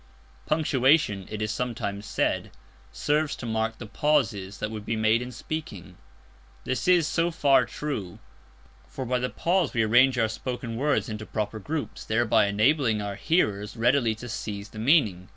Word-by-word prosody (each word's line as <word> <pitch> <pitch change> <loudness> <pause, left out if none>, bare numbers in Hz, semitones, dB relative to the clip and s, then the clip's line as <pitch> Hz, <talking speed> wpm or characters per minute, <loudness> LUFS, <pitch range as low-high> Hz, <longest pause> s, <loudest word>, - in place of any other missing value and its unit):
Punctuation, 135 - +2
it 110 0 -4
is 110 - -1
sometimes 110 -4 -3
said, - - -1 0.4
serves 145 - 0
to - - -8
mark 110 0 -1
the 120 - -8
pauses 110 -6 0
that 105 +2 -4
would 110 -2 -6
be 115 - -2
made 110 +1 +2
in 125 +1 -6
speaking. 120 - -6 0.7
This 130 +7 -2
is 175 -3 +5
so 165 +2 +1
far 140 -5 +3
true; 115 -12 -5 0.7
for 130 - -6
by 125 +1 0
the 125 0 -1
pause 175 -5 0
we 115 - +3
arrange 120 +4 +4
our 110 -2 +3
spoken 120 +1 -5
words 145 +4 +1
into 110 -1 -6
proper 110 0 -3
groups, 150 +7 -4
thereby 110 -1 +2
enabling 110 +2 +2
our 100 -1 -3
hearers 105 - 0
readily 120 -1 +2
to 120 +3 -9
seize 105 -3 -5
the 110 - -10
meaning. 110 - +2
115 Hz, 165 wpm, -26 LUFS, 105-140 Hz, 0.7 s, is